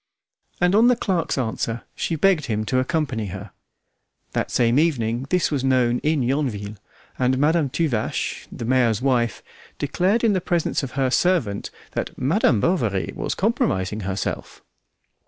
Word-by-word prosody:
And 180 +1 +3
on 225 +4 +6
the 250 - +5
clerk's 180 -10 -1
answer, 115 -1 -2
she 165 - -2
begged 165 -2 +3
him 110 -2 -1
to 130 +3 +1
accompany 130 -5 -1
her. 95 +1 -8 0.8
That - - -1
same 120 +2 +3
evening 125 -6 0
this 180 -3 +1
was 140 -3 -1
known 125 -2 +2
in 150 -3 +1
Yonville, 120 -6 -2 0.4
and 130 0 +2
Madame 150 +1 +2
Tuvache, 130 -7 -2
the 115 - -6
mayor's 120 -3 +2
wife, 120 -5 +1 0.3
declared 185 - +1
in 225 -3 +4
the 185 - 0
presence 170 -2 0
of 135 -3 -6
her 130 -1 0
servant 145 - +1 0.2
that - - -4
"Madame 135 - +2
Bovary 115 - 0
was - - -3
compromising 110 - 0
herself." 95 -1 -4
130 Hz, 150 wpm, -23 LUFS, 115-165 Hz, 0.8 s, on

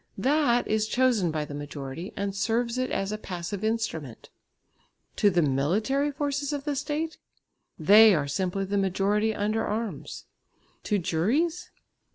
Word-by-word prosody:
That 270 -4 +2
is 215 0 +1
chosen 240 -7 +2
by 155 -1 -2
the 145 - -9
majority 145 +4 -6
and 200 0 -2
serves 235 +4 0
it 255 - -1
as 195 +1 -2
a 215 - -4
passive 185 +1 -5
instrument. 215 - -3 0.9
To 205 - +5
the 175 -3 +2
military 205 - +1
forces 285 0 -2
of 285 -1 -3
the 295 -1 -2
State? 305 +3 -3 0.6
They 210 +5 +7
are 145 -2 -1
simply 190 +5 -1
the 200 +1 0
majority 200 +3 +1
under 215 +1 -1
arms. 220 +1 -4 0.6
To 210 - +1
juries? 235 - 0
210 Hz, 145 wpm, -27 LUFS, 180-255 Hz, 0.9 s, They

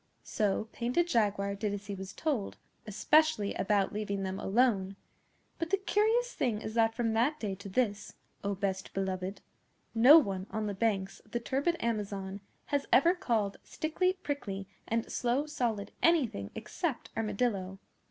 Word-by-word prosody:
So 210 +1 0
Painted 250 +9 +1
Jaguar 205 - +1
did 205 0 -2
as 205 0 -8
he 200 - -5
was 190 0 -6
told, 265 -5 -2 0.3
especially 300 +1 +3
about 200 -1 +1
leaving 200 -2 -2
them 190 0 -3
alone; 195 -3 +2 0.6
but 330 -1 -2
the 395 - +3
curious 440 +5 +1
thing 230 -5 0
is 220 0 -6
that 225 -1 +3
from 230 -2 0
that 255 +7 +2
day 205 -3 -2
to 200 +1 -8
this, 210 -1 -1 0.3
O 200 0 -1
Best 190 -1 -3
Beloved, 190 0 -2 0.5
no 250 +7 +9
one 195 - +1
on 220 0 -2
the 205 - -2
banks 195 -2 -1
of - - -24
the 240 - -2
turbid 280 +8 0
Amazon 200 -3 -2 0.2
has 285 -1 -1
ever 335 +7 +6
called 225 - -1
Stickly 340 +4 0
Prickly 280 - -4 0.2
and 230 0 0
Slow 250 +4 +1
Solid 230 -9 -2
anything 255 - +2
except - - -3
Armadillo. 205 -3 -1
215 Hz, 155 wpm, -31 LUFS, 200-265 Hz, 0.6 s, no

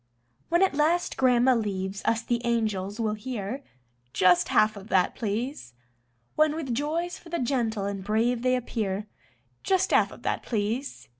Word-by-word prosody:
When 345 +3 +4
at 385 - +2
last 315 +4 +1
Grandma 255 0 +4
leaves 195 -3 -2
us 230 +1 +1
the 235 0 -1
angels 215 -3 -1
will 220 -2 0
hear: 225 +2 -5 0.5
"Just 180 -1 +4
half 215 0 +3
of 200 0 -10
that, 185 -4 +2
please." 220 - -4 0.6
When 310 0 +3
with 285 -7 -3
joys 320 +7 -2
for 340 - -15
the 340 - -1
gentle 235 -6 -1
and 200 -1 -4
brave 230 +4 +1
they 255 0 +2
appear: 210 -5 -2 0.6
"Just 380 -1 +1
half - - +4
of - - -13
that, - - -1
please." 230 +5 -3
235 Hz, 160 wpm, -27 LUFS, 205-270 Hz, 0.6 s, When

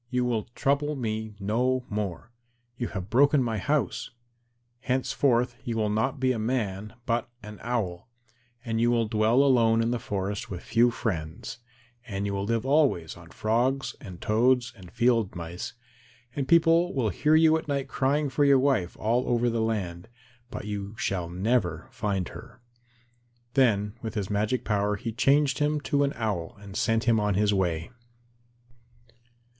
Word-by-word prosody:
You 125 -1 0
will 115 -3 -1
trouble 145 +2 +1
me 110 -4 -3
no 125 +5 0
more. 105 +1 -4 0.4
You 120 -1 -3
have 95 -1 -6
broken 140 +2 +4
my 115 -3 -1
house. 125 -3 -1 0.7
Henceforth 125 -1 +1
you 120 -3 -3
will 110 -1 +1
be - - -1
not 130 +5 -1
a 130 -3 +2
man 110 -3 -2
but 120 -1 -1
an 105 0 -9
Owl, 110 -4 -3 0.6
and 115 -1 -1
you 120 - +4
will 115 -2 +2
dwell 110 +4 +3
alone 115 -5 +4
in 115 +1 +1
the 120 - -1
forest 100 -2 -3
with 90 -2 -6
few 120 +1 +3
friends, 95 +2 -4 0.5
and 100 -2 -3
you 100 - -2
will 100 0 -2
live 115 +2 -1
always 135 - +2
on 85 -1 -14
frogs 120 +8 0
and 95 -7 -9
toads 125 +3 +2
and 95 -5 -13
field 115 -4 +2
mice, 85 +5 -6 0.6
and 140 -2 -2
people 170 +1 +4
will 120 -5 +1
hear 150 - +2
you 160 0 +6
at 160 - -3
night 140 -2 -1
crying 140 +3 +1
for 135 +2 +1
your 140 -1 +6
wife 130 -10 +1
all 120 +4 0
over 120 0 +2
the 115 0 0
land, 95 -6 -2 0.4
but - - -6
you 105 0 -5
shall 90 -3 -2
never 90 -3 0
find 95 -4 -2
her." 120 +2 -12 0.9
Then 105 -6 +2
with 110 -1 -5
his 105 -2 -2
magic 105 +5 0
power 105 -1 +1
he 115 +3 -4
changed 135 +4 +2
him 150 0 +1
to 145 0 +1
an 140 - 0
Owl 110 -2 -3
and 100 -1 -11
sent 115 0 +1
him 115 -1 +3
on 105 -2 +1
his 105 +1 +2
way. 85 -4 -1
115 Hz, 165 wpm, -27 LUFS, 100-130 Hz, 0.9 s, you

